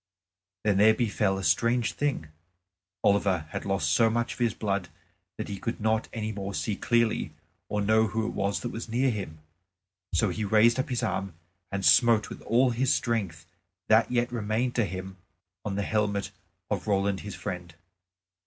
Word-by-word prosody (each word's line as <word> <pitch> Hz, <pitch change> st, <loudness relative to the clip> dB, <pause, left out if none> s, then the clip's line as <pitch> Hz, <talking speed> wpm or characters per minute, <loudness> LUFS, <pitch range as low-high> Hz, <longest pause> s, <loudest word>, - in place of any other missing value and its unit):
Then 105 Hz, -2 st, +2 dB
there 110 Hz, +1 st, +6 dB
befell 105 Hz, -4 st, 0 dB
a 95 Hz, -, -5 dB
strange 115 Hz, +9 st, +2 dB
thing. 135 Hz, -, -2 dB, 0.7 s
Oliver 100 Hz, -5 st, +2 dB
had -, -, -4 dB
lost 95 Hz, -5 st, 0 dB
so 115 Hz, +5 st, +4 dB
much 120 Hz, +1 st, -1 dB
of -, -, -14 dB
his 120 Hz, -3 st, +1 dB
blood 100 Hz, -3 st, -2 dB, 0.5 s
that -, -, -4 dB
he 100 Hz, -1 st, -5 dB
could 115 Hz, -, -4 dB
not 110 Hz, 0 st, +1 dB
any 110 Hz, -1 st, -3 dB
more 100 Hz, -1 st, -5 dB
see 105 Hz, -, -1 dB
clearly 115 Hz, 0 st, 0 dB, 0.3 s
or 105 Hz, -, -1 dB
know 110 Hz, +2 st, +3 dB
who 110 Hz, +2 st, -2 dB
it -, -, -3 dB
was 100 Hz, +1 st, -1 dB
that 120 Hz, -, -3 dB
was 115 Hz, 0 st, -6 dB
near 125 Hz, +3 st, +2 dB
him. 95 Hz, -8 st, -5 dB, 0.8 s
So 100 Hz, +4 st, +2 dB
he 105 Hz, +4 st, -3 dB
raised 110 Hz, +4 st, +4 dB
up 130 Hz, -, -1 dB
his 125 Hz, -1 st, -1 dB
arm 95 Hz, -5 st, -2 dB, 0.4 s
and 100 Hz, -1 st, -2 dB
smote 115 Hz, -4 st, +5 dB
with -, -, -8 dB
all 125 Hz, +3 st, +3 dB
his 125 Hz, +2 st, +1 dB
strength 100 Hz, -9 st, -1 dB, 0.4 s
that 110 Hz, +2 st, +4 dB
yet 120 Hz, 0 st, +1 dB
remained 115 Hz, +2 st, -1 dB
to 120 Hz, -, +3 dB
him 95 Hz, +1 st, -6 dB, 0.5 s
on 100 Hz, -2 st, -3 dB
the 100 Hz, -, -1 dB
helmet 105 Hz, -1 st, -1 dB, 0.4 s
of -, -, -2 dB
Roland 100 Hz, -1 st, +1 dB
his 105 Hz, -, -7 dB
friend. 90 Hz, -4 st, -6 dB
105 Hz, 180 wpm, -27 LUFS, 100-115 Hz, 0.8 s, there